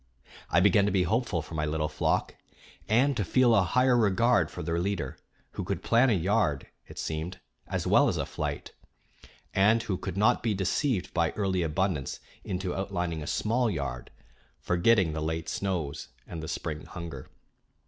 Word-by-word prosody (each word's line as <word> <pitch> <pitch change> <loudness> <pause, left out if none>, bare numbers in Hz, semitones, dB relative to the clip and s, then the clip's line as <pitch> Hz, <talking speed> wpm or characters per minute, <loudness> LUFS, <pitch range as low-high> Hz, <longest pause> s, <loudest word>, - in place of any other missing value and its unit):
I 85 - +4
began 100 +1 +4
to - - +1
be 95 -1 +2
hopeful 105 -3 0
for 80 - -11
my 75 -1 -1
little 75 0 -1
flock, - - -1 0.5
and 130 +6 +3
to 105 - 0
feel 120 +6 +4
a 100 - +5
higher 125 +7 +3
regard 115 +2 +3
for - - -7
their 85 +1 -1
leader, 90 -7 -3 0.3
who - - -5
could - - -3
plan 120 +3 +4
a - - +4
yard, 95 -6 +1 0.2
it - - -12
seemed, 80 +3 -4 0.3
as - - -2
well - - +5
as - - 0
a - - -1
flight, - - -4 0.8
and 110 +4 +4
who 95 -5 -2
could 95 0 -5
not 105 +2 +3
be 110 -3 0
deceived 95 - 0
by 85 -2 +2
early 95 -3 0
abundance 80 -3 -1 0.2
into 90 -1 -3
outlining 90 -4 -2
a 75 - -6
small 115 +2 +1
yard, 70 - -4 0.5
forgetting 90 -1 +3
the 80 - -3
late 80 +1 -2
snows 85 -11 -3 0.2
and 85 -2 -7
the 80 - -6
spring 75 0 -4
hunger. 85 -7 -8
95 Hz, 175 wpm, -28 LUFS, 80-105 Hz, 0.8 s, a